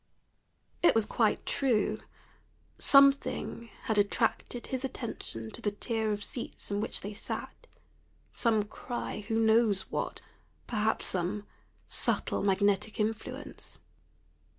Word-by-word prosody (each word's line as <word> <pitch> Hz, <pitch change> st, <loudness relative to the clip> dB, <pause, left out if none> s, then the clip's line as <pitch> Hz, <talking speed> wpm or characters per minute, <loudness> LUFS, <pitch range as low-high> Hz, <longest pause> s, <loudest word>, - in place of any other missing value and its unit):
It 345 Hz, -, +5 dB
was 225 Hz, -2 st, +3 dB
quite -, -, +1 dB
true. 250 Hz, -6 st, +1 dB, 0.8 s
Something 275 Hz, -4 st, +5 dB
had 220 Hz, -2 st, +1 dB
attracted 225 Hz, +3 st, 0 dB
his 260 Hz, 0 st, -3 dB
attention 220 Hz, -, -6 dB
to -, -, -7 dB
the 205 Hz, -, +1 dB
tier 220 Hz, +1 st, -2 dB
of 205 Hz, 0 st, -3 dB
seats 235 Hz, -3 st, -6 dB
in 205 Hz, 0 st, 0 dB
which 220 Hz, -, -2 dB
they 205 Hz, +2 st, -6 dB
sat, -, -, -6 dB, 0.7 s
some 220 Hz, -3 st, +2 dB
cry 240 Hz, +3 st, -5 dB
who 225 Hz, 0 st, +1 dB
knows 220 Hz, -3 st, +4 dB
what? -, -, -3 dB, 0.4 s
perhaps 220 Hz, -1 st, 0 dB
some 190 Hz, +3 st, -1 dB, 0.4 s
subtle -, -, +2 dB
magnetic 200 Hz, +2 st, +1 dB
influence. 215 Hz, 0 st, -4 dB
220 Hz, 115 wpm, -30 LUFS, 205-235 Hz, 0.8 s, It